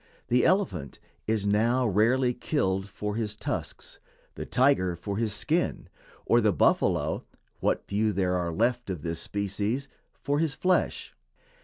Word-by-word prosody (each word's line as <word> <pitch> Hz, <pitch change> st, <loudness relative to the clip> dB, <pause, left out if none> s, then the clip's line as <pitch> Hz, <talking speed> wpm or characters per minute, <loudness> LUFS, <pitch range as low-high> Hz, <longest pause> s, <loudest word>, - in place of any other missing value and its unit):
The 125 Hz, +1 st, +3 dB
elephant 100 Hz, -, 0 dB, 0.3 s
is 110 Hz, -2 st, 0 dB
now 115 Hz, +5 st, +2 dB
rarely 120 Hz, +5 st, +3 dB
killed 95 Hz, -8 st, -1 dB
for 105 Hz, +1 st, -4 dB
his 105 Hz, -2 st, -2 dB
tusks, -, -, -5 dB, 0.3 s
the -, -, -7 dB
tiger 125 Hz, -10 st, +3 dB
for 100 Hz, +3 st, -5 dB
his 110 Hz, -1 st, 0 dB
skin, 155 Hz, +12 st, -1 dB, 0.4 s
or -, -, +4 dB
the -, -, +3 dB
buffalo -, -, +2 dB, 0.4 s
(what -, -, 0 dB
few 105 Hz, +2 st, +1 dB
there 90 Hz, -2 st, 0 dB
are 85 Hz, -1 st, -1 dB
left 120 Hz, +5 st, 0 dB
of 90 Hz, -6 st, -4 dB
this 85 Hz, -1 st, -3 dB
species) 105 Hz, +6 st, -2 dB, 0.3 s
for 145 Hz, +1 st, 0 dB
his 160 Hz, -4 st, 0 dB
flesh. 185 Hz, 0 st, 0 dB
105 Hz, 145 wpm, -27 LUFS, 95-125 Hz, 0.4 s, or